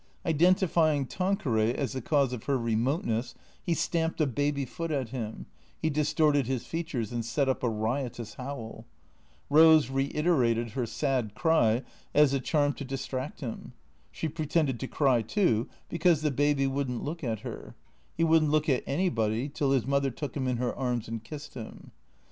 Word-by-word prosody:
Identifying 165 -3 +3
Tanqueray 130 - 0
as 140 - -2
the 130 - -3
cause 140 0 +1
of 120 - -6
her 140 -1 +1
remoteness, 115 0 -1 0.3
he 170 - 0
stamped 165 0 -1
a 155 - +4
baby 145 +1 -1
foot 165 +6 -5
at 135 -6 -1
him; 110 -3 -5 0.3
he 160 - 0
distorted 150 -2 +2
his 130 -3 -2
features 155 -10 -3
and 120 -1 -2
set 135 +5 0
up 130 0 0
a 125 - +1
riotous 115 0 -3
howl. 115 -3 -7 0.6
Eose 155 -4 +6
reiterated 135 -5 +1
her 125 -1 -2
sad 125 -6 -1
cry 130 -8 +3 0.3
as 150 -2 +5
a 135 - +2
charm 145 +2 +1
to 140 - -7
distract 135 +1 -5
him. 120 -5 -6 0.4
She 160 - -4
pretended 155 -4 0
to 135 - -4
cry 130 -5 +2
too, 115 - +1 0.2
be 170 - -5
cause 160 -2 +3
the 150 - +2
baby 145 0 +2
would 135 0 -1
n't 125 -2 -4
look 165 +3 -5
at 115 -4 -2
her. - - -8 0.4
He 165 - +2
would 165 0 +5
n't 155 - +1
look 155 0 +2
at 130 -4 +2
anybody 130 - 0
till 140 -1 -1
his 135 -5 +2
mother 140 0 +1
took 135 +1 -6
him 135 -3 -1
in 125 -1 0
her 120 0 -1
arms 125 -3 -2
and 115 -1 -5
kissed 150 +6 -9
him. 115 -4 -9
135 Hz, 180 wpm, -29 LUFS, 120-155 Hz, 0.6 s, Eose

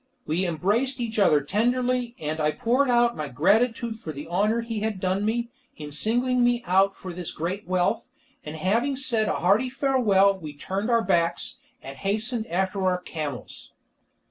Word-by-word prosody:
We 175 +4 0
embraced 210 - 0
each 225 -2 -2
other 150 -7 +4
tenderly, 245 - 0
and 155 +1 -4
I 150 0 +2
poured 255 +4 +1
out 240 -1 +3
my 150 - -4
gratitude 220 - +1
for 160 - -6
the 145 0 -8
honour 210 +6 +1
he 230 -2 -4
had 215 -2 -2
done 185 +2 0
me, 235 +2 -1 0.3
in 150 -1 -8
singling 245 - +1
me 240 0 +2
out 195 +2 +3
for 185 -2 -8
this 175 -1 -5
great 180 +5 -4
wealth, 180 -1 0 0.3
and 150 +1 -7
having 230 - 0
said 235 -5 +1
a - - 0
hearty 205 +9 +2
farewell 235 -8 +3
we 155 -4 -8
turned 190 +9 -3
our 230 -1 +3
backs, 170 -3 0 0.2
and 135 +1 -8
hastened 220 - -1
after 190 +3 -1
our 185 -1 +2
camels. 150 -7 -7
205 Hz, 170 wpm, -25 LUFS, 175-235 Hz, 0.3 s, other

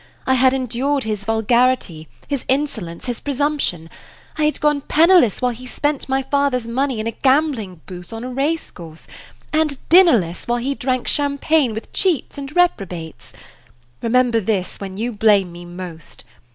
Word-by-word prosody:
I 260 - +2
had 260 0 +4
endured 265 +2 -1
his 210 -2 -3
vulgarity, 225 -7 +1 0.2
his 280 -3 -2
insolence, 235 - -2
his 245 -2 -3
presumption; 285 - -1 0.5
I 305 - +1
had 300 - 0
gone 295 -1 +2
penniless 315 - +4
while 250 - +2
he 250 +2 -9
spent 290 +1 -2
my 265 0 +1
father's 270 -3 0
money 260 0 -1
in 215 - -3
a 230 - -1
gambling 260 - 0
booth 180 -1 -10
on 225 +1 -6
a 250 - -5
race 295 +5 -1
course, 165 -2 -11 0.5
and 305 -3 +1
dinnerless 245 - +4
while 240 0 +1
he 260 +4 -1
drank 255 -2 -2
Champagne 285 -3 +1
with 220 - -8
cheats 330 -7 0
and 275 +2 -8
reprobates. 185 - -1 0.7
Remember 240 0 +2
this 195 -3 -2
when 195 -1 -7
you 235 +3 -2
blame 205 -4 +3
me 175 0 -10
most. 175 -2 -9
250 Hz, 160 wpm, -20 LUFS, 205-280 Hz, 0.7 s, had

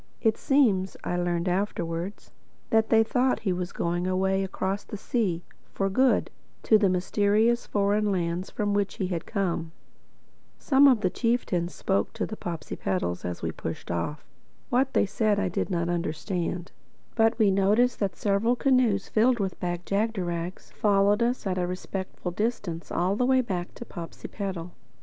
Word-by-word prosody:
It 220 -2 +2
seems 210 -10 +2
(I 175 - -1
learned 175 -1 0
this 180 - +1
afterwards) 180 -1 -3 0.4
that 220 0 +3
they 225 -1 +6
thought 250 +3 +1
he 190 -4 0
was 180 0 -3
going 175 +1 -1
away 190 +1 +1
across 190 +1 -2
the 210 - -7
sea, 195 -6 -1 0.3
for 195 0 0
good, 260 +5 +3 0.3
to 220 - +5
the 200 -2 +3
mysterious 205 +5 +2
foreign 205 +1 +1
lands 175 0 -1
from 205 -1 -1
which 200 -1 0
he 185 - -2
had 170 -3 -3
come. 175 -6 -1 0.9
Some 280 0 +5
of 250 -6 +4
the 185 - +1
chieftains 215 -8 0
spoke 195 0 0
to 225 - -2
the 215 - -6
Popsipetels 95 - -3
as 90 -1 -5
we - - -1
pushed - - -6
off. 85 - -3 0.5
What 260 +2 +2
they - - +4
said 205 +1 +1
I 200 -2 0
did 175 - -2
not 170 -3 0
understand; 175 +1 -2 0.4
but 225 0 +3
we 215 -4 +4
noticed 210 +6 +3
that 200 -3 -1
several 210 +4 +1
canoes 245 -7 +2
filled 235 +2 +3
with 195 -2 -2
Bag 175 0 -3
jagderags 185 -5 -2
followed 205 +1 +3
us 240 0 0
at 185 -1 -1
a 180 - 0
respectful 185 0 -5
distance 190 -5 -3
all 180 +3 +1
the 250 +3 +1
way 260 0 +4
back 185 -7 -4
to 235 - -8
Popsipetel. 175 0 -6
195 Hz, 165 wpm, -27 LUFS, 175-220 Hz, 0.9 s, they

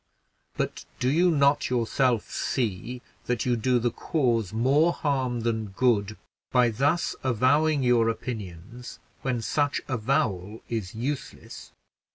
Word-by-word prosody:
but - - -3 0.2
do 125 - 0
you 175 +4 +4
not 140 -3 +3
yourself 125 -1 +1
see 120 +1 -2 0.2
that 125 -3 -1
you 125 -1 +2
do 125 +2 +1
the 120 0 0
cause 115 - 0
more 140 +9 +3
harm 130 -7 -1
than 110 -2 -1
good 105 -1 +1 0.3
by 125 -2 +4
thus 145 +9 +1
avowing 135 +4 +2
your 120 -2 +3
opinions 115 0 -6 0.2
when 125 -3 -2
such 145 +2 0
avowal 110 -5 -1
is 110 -5 -4
useless? 130 +5 -6
125 Hz, 125 wpm, -26 LUFS, 110-135 Hz, 0.3 s, you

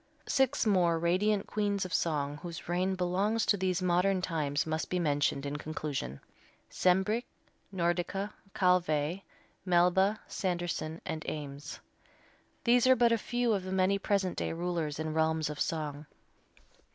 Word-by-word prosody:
Six 265 0 +2
more 180 -5 +3
radiant 195 +5 +1
queens 205 -2 -1
of 185 - -6
song 145 -3 0
whose 170 0 -8
reign 185 +2 0
belongs 190 +5 +1
to - - +3
these 185 -1 -1
modern 180 +2 +2
times 155 -5 -1
must 160 0 -2
be 180 - 0
mentioned 145 -4 +1
in 145 +1 -3
conclusion: 145 - -4 0.5
Sembrich, 190 +6 +2 0.5
Nordica, 185 +3 -1 0.2
Calvé, 180 -2 +2 0.4
Melba, 185 +3 +3
Sanderson 175 -3 -3
and 160 -3 -4
Eames. 145 -1 -6 0.8
These 245 +1 +4
are 260 - +7
but 240 -1 +4
a 230 - +4
few 240 -1 0
of 200 - 0
the 185 - -5
many 190 +1 +2
present 195 -3 0
day - - -2
rulers 165 -3 -2
in 160 - -3
the 155 - -3
realms 160 -1 +1
of 150 - -8
song. 150 -2 -3
180 Hz, 145 wpm, -31 LUFS, 155-195 Hz, 0.8 s, are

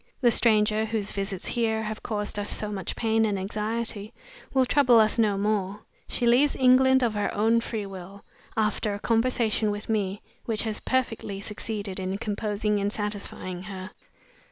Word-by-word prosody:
The 240 -3 +4
stranger 215 -1 +3
whose 215 -2 -2
visits 195 -2 -4
here 220 -2 0
have 215 0 -5
caused 210 -2 -2
us 205 - -2
so 210 -1 -1
much 190 -4 -4
pain 225 -1 +2
and 210 -2 +1
anxiety 215 +2 -3 0.4
will 260 -1 +3
trouble 250 -3 +5
us 215 +1 +3
no 210 -3 +3
more. 205 -1 -1 0.3
She 245 - -1
leaves 255 +5 +4
England 260 0 +5
of 230 -3 +1
her 205 -1 -1
own 225 +3 +3
free 220 -3 -4
will, 195 +1 -10 0.3
after 210 -1 0
a - - -7
conversation 225 -2 +1
with 205 +1 -5
me 205 -2 -1 0.2
which 220 -2 0
has 220 -2 -3
perfectly 225 -6 -1
succeeded 205 -1 -5
in 190 +1 -2
composing 210 0 -1
and 200 +1 0
satisfying 205 -4 -4
her. 190 0 -7
215 Hz, 165 wpm, -26 LUFS, 205-230 Hz, 0.4 s, trouble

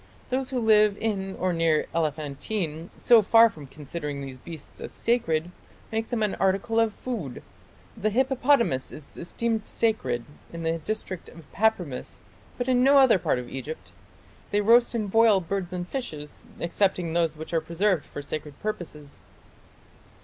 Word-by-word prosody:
Those 260 0 0
who 260 -2 -1
live 215 -2 +4
in 195 -3 -2
or 185 -1 0
near 165 -2 +2
Elephantine, 155 +2 -2
so 235 -2 +6
far 225 +2 +6
from 150 -6 -11
considering 150 +1 -6
these 135 -2 -7
beasts 160 +1 -10
as - - -6
sacred, 175 -8 0 0.4
make 225 0 -2
them 235 -3 0
an 210 - 0
article 195 +4 +1
of 225 -2 +2
food.... 210 - -5 0.5
The 215 -1 0
hippopotamus 250 - +2
is 150 -2 -11
esteemed 220 +5 -2
sacred 130 - -1 0.3
in 170 0 -6
the 165 0 0
district 190 0 -4
of 165 -2 -14
Papremis, 185 -11 0 0.4
but 245 - -2
in 250 -1 +3
no 280 +2 +6
other 260 -8 +6
part - - +1
of 125 -1 -5
Egypt.... 135 +4 -7 0.6
They 205 - +2
roast 235 +3 +5
and 210 -4 -2
boil... 225 -2 +5
birds 185 +1 -3
and 180 -1 -4
fishes... 155 - -6 0.2
excepting 175 -1 0
those 165 -2 +1
which 160 +2 -8
are 165 - +2
preserved 170 +1 0
for 145 - -8
sacred 150 0 -6
purposes." 160 -8 -6
185 Hz, 155 wpm, -26 LUFS, 155-225 Hz, 0.6 s, so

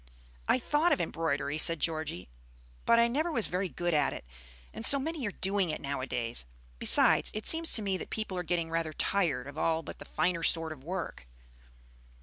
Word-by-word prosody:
"I - - +3
thought 295 +7 0
of 300 - +1
embroidery," 155 -3 -3
said 165 0 +2
Georgie; 155 - -4 0.6
"but 230 - +4
I 235 0 +4
never 305 +8 -2
was 230 -8 +1
very 185 +1 -3
good 175 0 -3
at 145 -2 0
it, - - -10 0.5
and - - -8
so 280 - +10
many 295 -2 -4
are - - -4
doing 195 -2 -1
it 155 - -4
nowadays. 125 - -4 0.3
Besides, - - +6
it 215 - -5
seems 325 0 +5
to 220 - +5
me 195 -2 -1
that - - -8
people 215 -4 -5
are 180 - -3
getting 170 -1 -3
rather 165 -1 -3
tired 155 -9 -1
of 140 +2 -9
all 165 0 -1
but - - -10
the - - -11
finer 175 -2 -2
sort 165 -1 0
of 145 -4 -11
work." 170 - -7
170 Hz, 195 wpm, -29 LUFS, 155-215 Hz, 0.6 s, so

